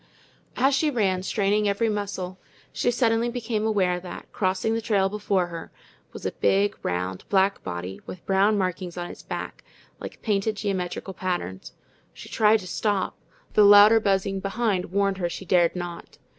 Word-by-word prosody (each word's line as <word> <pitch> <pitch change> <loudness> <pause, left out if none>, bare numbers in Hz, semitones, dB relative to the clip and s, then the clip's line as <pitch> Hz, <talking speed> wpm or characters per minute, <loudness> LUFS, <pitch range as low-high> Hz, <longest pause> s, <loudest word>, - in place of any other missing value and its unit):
As 270 +3 +3
she 300 +3 +2
ran, 195 -8 +1
straining 205 +1 +1
every 200 +3 +1
muscle, 195 -3 -3 0.3
she - - 0
suddenly 235 -1 +2
became 225 -3 -2
aware 185 -5 +1
that, 180 0 -10
crossing 190 +3 0
the 225 - -1
trail 200 -3 +1
before 200 -3 0
her, 165 -1 -8 0.4
was - - -10
a - - 0
big, 200 +1 +1
round, 90 +1 -2
black 195 0 +2
body, 90 +2 -6
with 185 - -9
brown 200 +2 +3
markings 185 -2 -3
on 175 0 -4
its - - -12
back, - - -6 0.4
like - - -8
painted 210 0 0
geometrical 190 -2 -3
patterns. 175 - -4 0.4
She - - -11
tried 215 0 +3
to 185 - -9
stop, 200 +1 -1 0.3
but - - -29
the - - +8
louder 205 +2 +8
buzzing 195 -1 0
behind 195 -1 -1
warned 195 +1 0
her 175 -2 -1
she 190 - -7
dared 175 -1 +3
not. 175 -1 -7
195 Hz, 170 wpm, -25 LUFS, 185-215 Hz, 0.4 s, the